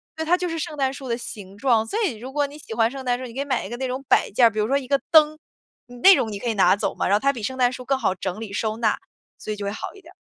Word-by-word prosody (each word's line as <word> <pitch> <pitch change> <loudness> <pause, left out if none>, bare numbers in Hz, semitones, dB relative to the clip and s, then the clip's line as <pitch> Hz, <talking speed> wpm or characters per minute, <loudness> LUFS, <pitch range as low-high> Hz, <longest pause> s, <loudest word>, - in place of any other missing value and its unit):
对， 320 - -3
它 355 +3 +3
就 360 0 -2
是 330 -1 -3
圣 300 - -5
诞 270 -1 0
树 275 -1 -8
的 235 - 0
形 200 -5 -9
状， 235 -2 +3
所 430 - -3
以 310 - -1
如 255 +4 -8
果 290 +1 +1
你 285 +1 -9
喜 230 - -13
欢 225 0 +3
圣 270 0 -7
诞 245 -1 0
树， 255 - -6
你 235 - -9
可 265 - -6
以 280 - -1
买 260 -7 -1
一 - - -7
个 240 - -5
那 260 +1 -2
种 255 +2 -4
摆 - - +3
件 235 +4 +4
儿， 230 - +7
比 215 - -4
如 210 - +1
说 275 +3 +2
一 265 -3 -5
个 275 0 +2
灯。 310 -1 +6 0.5
你 245 0 -12
那 380 +9 +8
种 220 - -1
你 200 - -5
可 240 - -5
以 - - +1
拿 190 -2 +4
走 - - -2
嘛， - - -1
然 195 - +2
后 205 - +4
它 275 +4 +2
比 235 -4 -7
圣 260 +5 -3
诞 245 -1 +3
树 255 - -7
更 265 +1 0
好 190 - 0
整 185 +2 -4
理 220 -3 -7
收 215 +2 -2
纳， 225 -2 +1 0.4
所 - - -6
以 - - -2
就 205 - -5
会 200 - -2
好 - - -6
一 395 - -14
点 - - -16
儿。 - - -21
245 Hz, 390 characters per minute, -23 LUFS, 215-275 Hz, 0.5 s, 那